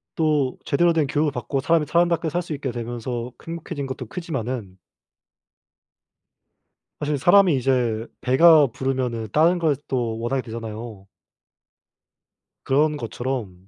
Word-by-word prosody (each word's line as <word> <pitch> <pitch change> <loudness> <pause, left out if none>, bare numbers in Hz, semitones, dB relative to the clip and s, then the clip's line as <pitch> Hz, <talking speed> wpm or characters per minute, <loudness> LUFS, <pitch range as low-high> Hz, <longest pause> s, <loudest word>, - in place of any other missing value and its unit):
또 150 -5 +1
제대로 170 +4 +3
된 155 -3 +1
교육을 150 +1 +1
받고 140 -1 -3
사람이 165 +1 +2
사람답게 170 +1 +1
살 175 +4 -1
수 170 -2 -6
있게 140 -3 -3
되면서 120 +1 -5 0.2
행복해진 165 -4 -5
것도 130 - -6
크지만은 125 - -5 2.2
사실 150 -1 -1
사람이 175 +1 +5
이제 120 -4 0
배가 150 +3 +6
부르면은 125 -2 -2
다른 170 +4 +3
걸 160 -4 +2
또 120 -4 -1
원하게 125 +3 -1
되잖아요. 110 -3 -8 1.6
그런 150 +3 +2
것처럼 115 -7 -5
135 Hz, 275 characters per minute, -23 LUFS, 120-155 Hz, 2.2 s, 배가